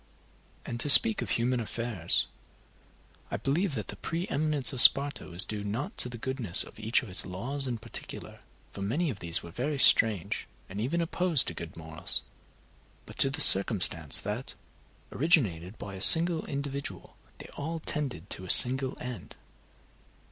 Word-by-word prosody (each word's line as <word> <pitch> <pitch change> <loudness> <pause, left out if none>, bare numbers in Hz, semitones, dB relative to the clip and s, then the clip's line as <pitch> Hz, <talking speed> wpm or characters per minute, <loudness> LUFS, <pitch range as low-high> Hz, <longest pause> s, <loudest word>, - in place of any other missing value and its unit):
And, 120 - -7
to 145 - -1
speak 225 +8 +7
of - - -6
human 125 +1 -2
affairs, 115 -6 -3 1.0
I - - -5
believe 155 +3 -3
that 105 -4 -7
the - - -7
pre 165 - -6
eminence 145 -4 -2
of 125 - +4
Sparta 140 +2 +4
was 90 +1 +1
due 105 -1 -7
not 110 +8 -6
to 125 - +1
the 120 - -10
goodness 120 -7 -2
of - - -17
each 110 +4 -1
of 115 - -11
its 90 - -1
laws 130 +10 -6
in 120 -2 -5
particular, 110 - -11 0.3
for 100 - -11
many 140 - -3
of 100 - -11
these 85 0 -5
were 85 - -12
very 140 - -5
strange, 110 -8 +4 0.2
and 100 +3 -8
even 160 +9 -3
opposed 170 -3 +1
to - - -9
good 85 +1 -11
morals, 80 -1 -4 0.8
but - - -16
to 135 - +3
the 135 - -4
circumstance 90 -6 +3
that, 105 +6 -6 0.6
originated 110 - -1
by 100 - -10
a 95 - -10
single 165 - +8
individual, 140 0 -7 0.2
they - - -13
all 160 +3 -7
tended 140 - -5
to 95 - -5
a 95 - -11
single 130 +4 +5
end. 125 -3 -10
120 Hz, 170 wpm, -27 LUFS, 100-145 Hz, 1.0 s, single